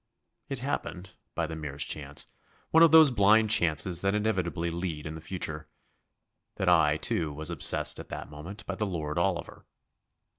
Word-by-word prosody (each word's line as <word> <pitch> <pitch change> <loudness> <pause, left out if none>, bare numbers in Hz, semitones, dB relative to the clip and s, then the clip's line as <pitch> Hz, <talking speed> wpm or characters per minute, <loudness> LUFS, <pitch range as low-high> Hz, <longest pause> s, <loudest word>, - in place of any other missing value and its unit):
It 135 -3 -4
happened, 95 - -4 0.2
by 85 - 0
the 80 0 -6
merest 70 -3 -3
chance 70 -1 -2 0.4
one 160 - +5
of 165 - +8
those 160 -3 +8
blind 110 0 +4
chances 85 -1 +2
that 95 +1 +1
inevitably 90 -5 -1
lead 85 -3 -4
in 75 - -5
the 80 - -8
future 80 -3 -5 0.9
that - - -3
I, - - +4
too, 80 -3 -1
was 75 +2 -4
obsessed - - 0
at - - -10
that - - -7
moment 90 +8 -9
by 100 - -4
the 105 +2 -2
Lord 80 -3 -3
Oliver. 85 -1 -3
85 Hz, 165 wpm, -28 LUFS, 75-100 Hz, 0.9 s, of